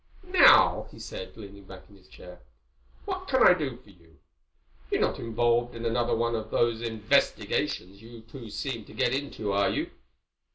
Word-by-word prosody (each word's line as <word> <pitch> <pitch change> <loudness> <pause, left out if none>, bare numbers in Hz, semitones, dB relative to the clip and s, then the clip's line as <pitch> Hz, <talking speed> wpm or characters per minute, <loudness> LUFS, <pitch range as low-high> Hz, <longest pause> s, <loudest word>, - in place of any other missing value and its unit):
"Now," 370 - +6
he - - -15
said, - - -8
leaning 100 -1 -12
back 95 0 -12
in 100 - -19
his 95 -1 -21
chair, 90 -1 -13 0.7
"what 375 -1 -5
can 260 -1 +4
I - - +8
do 145 -8 -4
for 120 -5 -20
you? 85 -4 -24 0.7
You're - - 0
not - - 0
involved 120 +1 0
in 115 0 -6
another 120 +1 0
one 115 +1 0
of 110 -1 -4
those 115 -1 0
investigations 105 -3 -1
you 115 0 -12
two 115 +1 -11
seem 115 +1 -5
to - - -15
get 120 - +1
into, 135 -7 -3
are 100 0 +2
you?" - - -3
115 Hz, 175 wpm, -27 LUFS, 100-120 Hz, 0.7 s, I